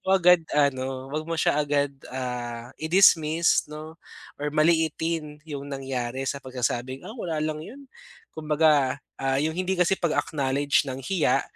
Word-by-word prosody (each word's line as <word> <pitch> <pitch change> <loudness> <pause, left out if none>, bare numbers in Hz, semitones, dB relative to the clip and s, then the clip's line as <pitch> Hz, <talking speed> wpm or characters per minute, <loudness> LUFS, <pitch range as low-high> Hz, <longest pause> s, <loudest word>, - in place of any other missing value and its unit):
mo - - +3
agad 180 -1 +6 0.2
ano, 135 -1 0
'wag 155 +1 -2
mo 165 - -1
siya 150 -1 +2
agad, 145 -1 +1 0.2
ah, 125 -1 -5
i-dismiss 165 -2 +4
'no 155 +2 -9 0.4
or 150 - -1
maliitin 160 0 +1
yung 145 -3 -6
nangyari 135 -2 -3
sa 140 +1 -3
pagsasabing, 130 0 -3
"Ah, 215 - -7
wala 175 -10 -4
lang 155 0 -3
yun." 260 - -10 0.5
Kumbaga, 150 -3 +2 0.2
ah, 135 0 +1
yung 160 - 0
hindi 185 +1 0
kasi 180 +2 +2
pag-acknowledge 145 -3 +1
ng 130 0 -5
hiya, 185 -2 +2
150 Hz, 145 wpm, -25 LUFS, 135-160 Hz, 0.5 s, agad